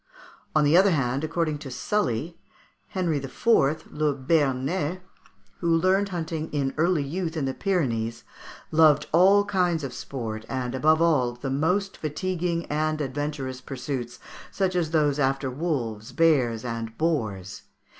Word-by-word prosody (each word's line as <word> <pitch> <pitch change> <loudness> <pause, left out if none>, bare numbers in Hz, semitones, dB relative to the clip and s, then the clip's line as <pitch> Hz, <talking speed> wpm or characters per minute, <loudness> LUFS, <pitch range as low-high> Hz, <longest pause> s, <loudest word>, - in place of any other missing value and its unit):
On 155 - +5
the 145 +3 +4
other 195 +3 +6
hand, 135 -4 0
according 155 -2 -1
to 145 - -8
Sully, 165 - -1 0.5
Henry 175 -5 -1
IV., 135 - -8 0.5
le 150 -1 0
Béarnais, 145 +4 0 0.6
who 170 -2 +2
learned 190 +4 +2
hunting 160 -3 -4
in 140 -2 -1
early 165 -1 +2
youth 165 +3 -3
in 145 - 0
the 135 - -1
Pyrenees, 120 - -1 0.5
"loved 155 -2 +5
all 195 +4 +6
kinds 180 -5 +1
of 135 -2 -4
sport, 115 -4 -5
and, 130 -2 -3
above 155 +5 +3
all, 135 -8 +2
the 130 +2 -5
most 180 +8 0
fatiguing 170 +2 -2
and 155 +1 -1
adventurous 140 -2 -3
pursuits, 125 -2 -5 0.3
such 190 -2 -1
as 170 -3 +1
those 150 -3 +2
after 135 -1 0
wolves, 125 -7 -3
bears, 125 -8 +2
and 115 -1 -5
boars." 110 - -2
150 Hz, 140 wpm, -25 LUFS, 130-170 Hz, 0.6 s, other